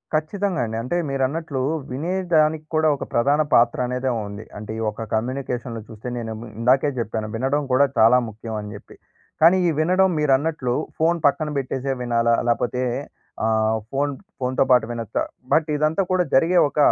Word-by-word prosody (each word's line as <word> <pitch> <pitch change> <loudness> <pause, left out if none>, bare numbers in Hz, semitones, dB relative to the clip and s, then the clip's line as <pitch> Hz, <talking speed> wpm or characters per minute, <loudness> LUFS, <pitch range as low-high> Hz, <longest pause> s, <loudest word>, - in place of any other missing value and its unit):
ఖచ్చితంగా 185 +3 -1
అండి. 110 - -5
అంటే 130 +9 -2
మీరన్నట్లు 135 +1 -1 0.3
వినేదానికి 160 0 +1
కూడా 155 0 +3
ఒక - - -6
ప్రధాన 140 +6 +3
పాత్ర 120 0 +4
అనేదే 125 +1 -1 0.2
ఉంది. 100 +2 -8
అంటే 105 +1 -7
ఈ - - -4
ఒక 110 +1 -7
కమ్యూనికేషన్‌లో 120 0 -3
చూస్తే 110 +2 -9
నేనేమో, 115 0 -5
ఇందాకే 130 +4 +3
జెప్పాను 110 -2 -3
వినడం 135 +5 0
కూడా 135 +3 +5
చాలా 115 +3 +6
ముఖ్యం 110 +1 -8
అని 105 0 -7
జెప్పి. 105 - -13 0.5
కానీ 170 +4 +7
ఈ - - +3
వినడం 185 +4 +3
మీరు 150 -2 +2
అన్నట్లు 140 -5 -2 0.3
ఫోన్ 170 +2 +3
పక్కన 145 +2 +2
పెట్టేసే 135 +1 -3
వినాలా 115 -1 +2
లేపోతే 125 +2 0 0.6
ఆహ్, 110 0 +2 0.2
ఫోన్ 140 +1 0 0.3
ఫోన్‍తో 130 +1 +1
పాటు 125 -3 +5
వినొచ్చా 115 -2 -2 0.3
బట్ 160 0 +3
ఇదంతా 155 +5 +1
కూడా 185 -1 +3
జరిగే 165 +7 +4
ఒక, 145 - -11
130 Hz, 160 wpm, -22 LUFS, 115-155 Hz, 0.6 s, కానీ